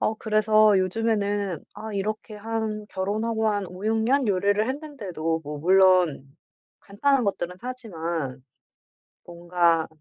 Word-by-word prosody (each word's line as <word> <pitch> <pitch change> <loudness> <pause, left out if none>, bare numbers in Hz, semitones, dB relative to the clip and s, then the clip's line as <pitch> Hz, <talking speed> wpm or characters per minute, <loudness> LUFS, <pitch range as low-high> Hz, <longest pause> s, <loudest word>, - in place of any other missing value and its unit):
어 220 - +1
그래서 215 -2 +4
요즘에는 205 -2 -1
아 220 0 -7
이렇게 215 +2 -3
한 215 0 -3
결혼하고 220 +4 -1
한 205 -2 -1
5-6 215 +5 -2
년 265 +3 +2
요리를 200 +3 +1
했는데도 205 - -3
뭐 150 +1 -6
물론 180 -5 +3 0.4
간단한 265 +6 +1
것들은 180 -3 -2
하지만 170 - -5 0.8
뭔가 170 -1 +1
205 Hz, 240 characters per minute, -25 LUFS, 175-220 Hz, 0.8 s, 그래서